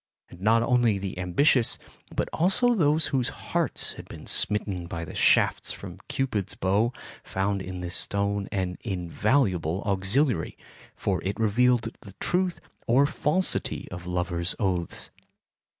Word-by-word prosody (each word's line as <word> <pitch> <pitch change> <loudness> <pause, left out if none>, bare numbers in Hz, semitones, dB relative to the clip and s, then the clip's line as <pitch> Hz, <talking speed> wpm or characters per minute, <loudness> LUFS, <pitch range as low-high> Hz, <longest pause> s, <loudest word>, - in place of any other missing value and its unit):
And 90 - -14
not 115 +3 +4
only 120 -3 +3
the 95 -2 -5
ambitious, 115 - +3 0.4
but - - 0
also 195 +9 +4
those 155 -6 +3
whose 130 -2 +1
hearts - - -1
had - - -11
been - - -10
smitten 100 -4 +1
by 85 0 -5
the - - -9
shafts - - +3
from - - -8
Cupid's 110 -8 -2
bow 100 +6 +1 0.3
found 100 +1 -1
in 90 -1 -6
this 90 0 -2
stone 100 0 0
an 95 -2 -2
invaluable 95 - 0
auxiliary, 100 - +1 0.4
for - - -1
it 100 +4 -3
revealed 115 +1 +2
the 100 - -12
truth 180 0 0 0.3
or 130 +5 +5
falsity 155 +4 0
of 90 0 -7
lover's 90 0 -1
oaths. 90 -4 -2
100 Hz, 135 wpm, -26 LUFS, 90-125 Hz, 0.4 s, or